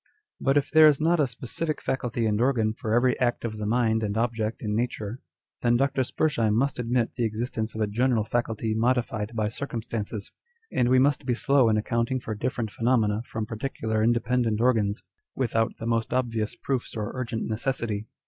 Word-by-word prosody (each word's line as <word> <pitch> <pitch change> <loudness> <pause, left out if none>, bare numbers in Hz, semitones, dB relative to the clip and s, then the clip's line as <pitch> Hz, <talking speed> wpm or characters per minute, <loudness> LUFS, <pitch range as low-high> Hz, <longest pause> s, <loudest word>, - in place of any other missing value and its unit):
But 135 +1 +2
if 145 - 0
there 155 0 +8
is 145 -2 +4
not 165 +2 +2
a 145 - +3
specific 130 +6 -3
faculty 120 -3 -2
and 105 0 +1
organ 120 -4 +2
for 110 0 -2
every 125 +1 +3
act 120 -1 0
of 110 -2 -4
the 105 - -2
mind 110 -1 +2
and 105 -1 -2
object 115 -1 -1
in 105 -1 -1
nature, 115 -1 -2 0.4
then 120 0 +3
Dr. 135 0 +1
Spurzheim 120 -6 +1
must 130 +2 +1
admit 120 -1 0
the 120 - 0
existence 110 0 -2
of 110 - -3
a - - +3
general 115 +2 +1
faculty 110 -1 -1
modified 115 -1 0
by 110 -2 +1
circumstances, 115 -3 -4 0.4
and 120 - +2
we 130 - +5
must 140 +1 +2
be 120 - +2
slow 135 -1 +3
in 110 - +3
accounting 115 +4 0
for 115 - -5
different 115 0 -2
phenomena 115 -3 +1
from 110 -1 -3
particular 110 -1 -2
independent 120 -1 +1
organs, 110 -4 +1 0.3
without 115 -3 0
the 115 - -6
most 115 +1 0
obvious 115 -4 -1
proofs 130 -4 -3
or 105 -1 -3
urgent 125 -3 -3
necessity. 110 -2 -2
115 Hz, 185 wpm, -26 LUFS, 110-125 Hz, 0.4 s, there